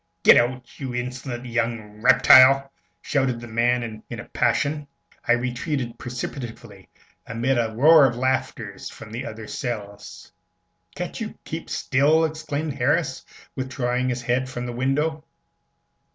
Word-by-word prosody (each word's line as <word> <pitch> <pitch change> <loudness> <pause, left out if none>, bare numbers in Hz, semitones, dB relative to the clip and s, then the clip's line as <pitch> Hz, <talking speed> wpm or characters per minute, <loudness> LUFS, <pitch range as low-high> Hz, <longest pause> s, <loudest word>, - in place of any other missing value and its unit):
"Git - - +9
out, 125 +1 -1
you 130 -3 -5
insolent 125 0 -5
young 115 -3 -3
reptyle!" 135 +3 +7 0.3
shouted 130 -4 0
the 120 - -9
man, 115 -1 0
in - - -6
a - - -8
passion. 145 0 0 0.4
I 120 - +5
retreated 125 +1 -2
precipitately, 125 -1 -7 0.4
amid 120 +3 0
a 115 -1 0
roar 155 +2 +7
of 120 - -3
laughter 130 +1 -2
from 110 -1 -9
the 115 +2 -5
other 110 0 -8
cells. 105 -4 -6 0.6
"Can't - - -5
you - - -5
keep - - -6
still?" 150 +4 +2
exclaimed 155 -1 -3
Harris, 135 +2 0 0.3
withdrawing 130 -1 -1
his 125 0 -3
head 125 +2 0
from 125 -1 -5
the 120 - -5
window. 145 +5 -1
125 Hz, 135 wpm, -23 LUFS, 120-135 Hz, 0.6 s, Git